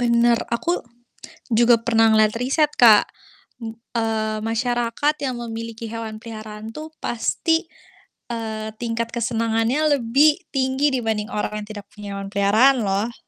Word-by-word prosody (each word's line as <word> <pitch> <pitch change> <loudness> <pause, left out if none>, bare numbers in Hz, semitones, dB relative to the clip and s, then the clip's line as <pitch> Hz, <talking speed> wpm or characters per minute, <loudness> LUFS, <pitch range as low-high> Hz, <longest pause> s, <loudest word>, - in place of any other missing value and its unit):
Benar, 235 -1 +3
aku 340 +8 -1 0.7
juga 235 +1 +5
pernah 225 -1 +4
ngelihat 215 -1 +4
riset, 295 +4 +1
Kak. 220 -4 +8 0.9
Eee, 220 -1 -1
masyarakat 240 +5 0
yang 260 -2 -2
memiliki 230 0 -6
hewan 225 -1 -5
peliharaan 220 -1 -8
tuh, 310 +1 -7
pasti, 325 +8 0 0.6
eee, 220 -1 -4
tingkat 230 0 -2
kesenangannya 235 +5 +1
lebih 285 +8 +4 0.2
tinggi 265 +2 +1
dibanding 220 -3 -1
orang 210 -1 -3
yang 210 - -12
tidak 205 -2 -8
punya 205 -1 -7
hewan 195 0 -6
peliharaan 220 +7 +4
loh. 200 +5 -1
230 Hz, 125 wpm, -22 LUFS, 220-245 Hz, 0.9 s, Kak